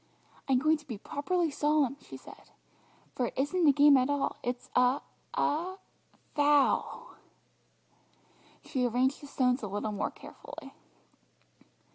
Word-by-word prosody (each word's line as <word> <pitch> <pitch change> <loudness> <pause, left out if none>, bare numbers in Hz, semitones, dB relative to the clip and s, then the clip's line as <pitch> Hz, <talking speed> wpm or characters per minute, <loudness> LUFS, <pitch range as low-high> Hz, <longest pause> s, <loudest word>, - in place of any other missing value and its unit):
"I'm 265 - +4
going 310 +4 +3
to 300 0 -19
be 230 -5 -5
properly 325 - -1
solemn," 290 -2 +1
she - - -11
said, - - -15 0.6
"for 250 - -1
it - - -9
isn't 305 +5 +1
a - - +8
game 285 0 +6
at 255 +1 +1
all, 285 -1 -1
it's 245 0 -4
a 250 +2 +4 0.4
a 345 +6 0 0.6
vow!" 290 -1 +2 1.5
She 285 -3 -2
arranged 255 +4 0
the 290 - -10
stones 255 -2 +1
a 210 - -4
little 205 +2 -3
more 205 -1 -2
carefully. - - -12
280 Hz, 135 wpm, -30 LUFS, 250-295 Hz, 1.5 s, a